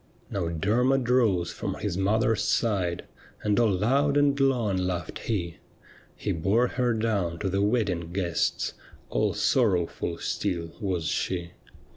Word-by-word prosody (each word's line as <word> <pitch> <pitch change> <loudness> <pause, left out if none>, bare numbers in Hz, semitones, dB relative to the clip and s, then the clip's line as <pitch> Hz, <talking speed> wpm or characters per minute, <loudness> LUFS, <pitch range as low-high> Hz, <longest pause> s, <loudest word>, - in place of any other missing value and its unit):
' - - -30
Now 95 -4 -1
Dcrmod 120 +10 +1
rose 110 -9 +3
from - - -4
his - - -3
mother's 110 +3 +2
side, 100 -6 0 0.4
And 105 +1 +2
all 115 -2 +4
loud 135 +9 +2
and 145 -1 +3
long 125 -7 +2
laughed 90 -3 -3
he; 85 -7 -3 0.6
He - - -3
bore 100 +9 +2
her 125 -2 0
down 100 -7 0
to 95 - -2
the 100 +1 0
wedding 100 -6 0
guests, 90 -2 -1 0.4
All - - +1
sorrowful 90 -7 +1
still 85 -4 -2
was 90 -5 -1
she. 85 +3 -2
100 Hz, 140 wpm, -27 LUFS, 85-115 Hz, 0.6 s, all